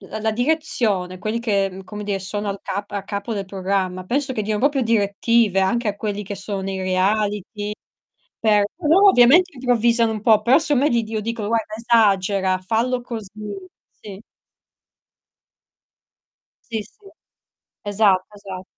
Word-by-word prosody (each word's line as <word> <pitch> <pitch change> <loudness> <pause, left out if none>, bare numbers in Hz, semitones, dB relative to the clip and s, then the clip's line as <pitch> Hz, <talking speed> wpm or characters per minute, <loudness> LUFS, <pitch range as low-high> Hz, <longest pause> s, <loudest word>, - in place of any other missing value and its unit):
la 215 +2 -7
la 220 0 +1
direzione 225 - -1
quelli 215 +5 -2
che, 205 -4 +1
ehm, 190 0 -6
come 210 +2 -8
dire 200 -1 -1
sono 205 +2 -4
al 195 0 -6
cap 200 +2 -5
a 200 -1 -3
capo 200 +2 -4
del 200 -3 -3
programma, 190 -1 -2
penso 265 +5 -1
che 215 - -1
diano 210 0 -2
proprio 280 0 +2
direttive 220 -1 +2
anche 215 +4 +1
a 205 - -2
quelli 210 -1 -3
che 200 0 -6
sono 195 -1 -5
i 190 - -4
reality 205 +2 -1 0.7
per 210 -2 +3
loro 360 +5 +5
ovviamente 340 +4 +6
improvvisano 235 -3 +2
un 215 - -4
po', 215 -1 +5
però 240 +6 +4
secondo 290 -4 +1
me - - +3
gli 235 -1 +2
dio 220 0 -4
dicono, 225 -1 -4
guarda, 225 -2 -1
esagera, 200 -5 +2
fallo 230 +6 -1
così. 225 -5 -7 0.7
Sì. 200 -1 -10 2.5
Sì, 220 -1 -2
sì. 395 - -19 0.7
Esatto, 200 -2 +2
esa 190 -2 -8
210 Hz, 155 wpm, -21 LUFS, 195-235 Hz, 2.5 s, ovviamente